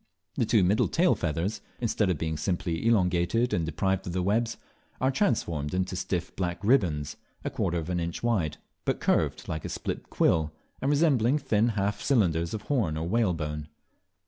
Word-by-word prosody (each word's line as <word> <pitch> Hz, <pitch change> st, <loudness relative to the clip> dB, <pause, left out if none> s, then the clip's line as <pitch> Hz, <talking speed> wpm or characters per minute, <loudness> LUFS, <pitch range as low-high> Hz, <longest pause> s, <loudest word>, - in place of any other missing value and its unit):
The -, -, 0 dB
two -, -, +4 dB
middle 100 Hz, +4 st, +3 dB
tail 175 Hz, +1 st, +3 dB
feathers, 85 Hz, +5 st, -2 dB, 0.2 s
instead 110 Hz, -4 st, +1 dB
of 90 Hz, -, +1 dB
being 80 Hz, +1 st, -2 dB
simply 85 Hz, +3 st, -1 dB
elongated 100 Hz, +2 st, +2 dB
and 80 Hz, -2 st, 0 dB
deprived 95 Hz, +4 st, -1 dB
of 85 Hz, -, -3 dB
their 90 Hz, 0 st, 0 dB
webs, 115 Hz, +4 st, +1 dB, 0.4 s
are 130 Hz, +1 st, +2 dB
transformed 85 Hz, -, 0 dB
into 95 Hz, 0 st, -1 dB
stiff 90 Hz, -1 st, -3 dB
black 90 Hz, -2 st, -2 dB
ribands, 85 Hz, -, +2 dB, 0.3 s
a -, -, -1 dB
quarter 85 Hz, -, -1 dB
of 80 Hz, -1 st, -3 dB
an 90 Hz, -1 st, -1 dB
inch 85 Hz, +3 st, -4 dB
wide, 90 Hz, -11 st, +1 dB, 0.3 s
but -, -, 0 dB
curved -, -, +1 dB
like 80 Hz, -1 st, -3 dB
a -, -, -4 dB
split -, -, -4 dB
quill, 80 Hz, -1 st, +2 dB, 0.3 s
and 135 Hz, -, +1 dB
resembling 145 Hz, -4 st, +3 dB
thin 110 Hz, -6 st, +2 dB
half 100 Hz, +1 st, 0 dB
cylinders 85 Hz, -, +2 dB
of 105 Hz, -, -6 dB
horn 105 Hz, -, 0 dB
or 80 Hz, +1 st, -2 dB
whalebone. 80 Hz, -8 st, 0 dB
90 Hz, 175 wpm, -28 LUFS, 80-115 Hz, 0.4 s, two